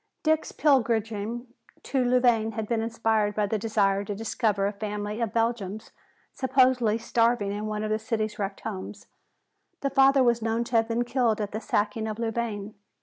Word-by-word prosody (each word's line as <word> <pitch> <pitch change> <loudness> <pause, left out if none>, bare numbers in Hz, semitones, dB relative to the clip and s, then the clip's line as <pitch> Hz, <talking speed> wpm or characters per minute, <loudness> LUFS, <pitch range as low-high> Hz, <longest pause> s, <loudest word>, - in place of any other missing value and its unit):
Dick's 315 0 +1
pilgrimage 235 -7 +2 0.7
to 265 -2 0
Louvain 245 -3 +3
had 220 -1 -4
been 230 -1 0
inspired 225 -2 0
by 210 - +1
the 215 +1 -1
desire 200 -2 +1
to 205 0 -4
discover 215 -2 0
a 200 - -1
family 210 +1 -4
of 225 -3 -1
Belgians 225 -3 -2 0.4
supposedly 255 -4 +3
starving 230 -2 +1
in 210 +1 -3
one 215 0 -3
of 215 - -2
the 215 - +1
city's 220 -1 -3
wrecked 195 -1 -3
homes. 200 -1 -6 0.8
The 275 - -1
father 270 0 +5
was 235 -1 +2
known 225 +1 0
to 235 0 -5
have 225 0 +2
been 230 +1 0
killed 240 -3 +1
at 205 -1 -3
the 215 - -4
sacking 215 +1 -1
of 215 -1 -4
Louvain. 225 -3 -3
225 Hz, 175 wpm, -26 LUFS, 210-235 Hz, 0.8 s, father